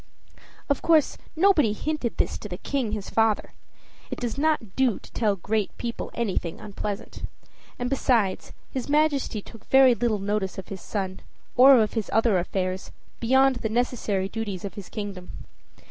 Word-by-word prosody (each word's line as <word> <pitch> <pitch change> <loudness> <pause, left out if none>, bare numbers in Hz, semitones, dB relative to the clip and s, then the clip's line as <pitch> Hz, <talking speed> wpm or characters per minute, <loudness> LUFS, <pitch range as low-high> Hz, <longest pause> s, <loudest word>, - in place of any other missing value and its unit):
Of 280 - 0
course, 320 -3 +4 0.2
nobody 320 - +4
hinted 300 0 -3
this - - 0
to 210 - -8
the 180 - -5
King 245 0 -2
his 210 -3 -5
father: 225 -2 +2 0.6
it - - -5
does 240 -2 -2
not 280 -9 0
do 260 -5 +2
to - - -15
tell 210 -3 +1
great 210 +2 -2
people 235 -1 -4
anything 190 -7 -2
unpleasant. 205 0 -6 0.6
And 245 - -2
besides, 240 -7 +1 0.2
his 260 +1 -4
Majesty 290 -8 +1
took 225 -2 -14
very 265 -1 +6
little 235 -2 0
notice 200 -1 -2
of 190 - -7
his 195 -2 -7
son, 190 -3 -4 0.4
or 260 +1 +8
of 215 -1 +1
his 225 -3 -2
other 225 -3 +3
affairs, 185 +1 -3 0.3
beyond 265 +2 +4
the 220 - -2
necessary 220 -5 0
duties 205 -3 -4
of 195 - -5
his 200 -3 -9
kingdom. 200 -4 -6
225 Hz, 160 wpm, -25 LUFS, 200-260 Hz, 0.6 s, or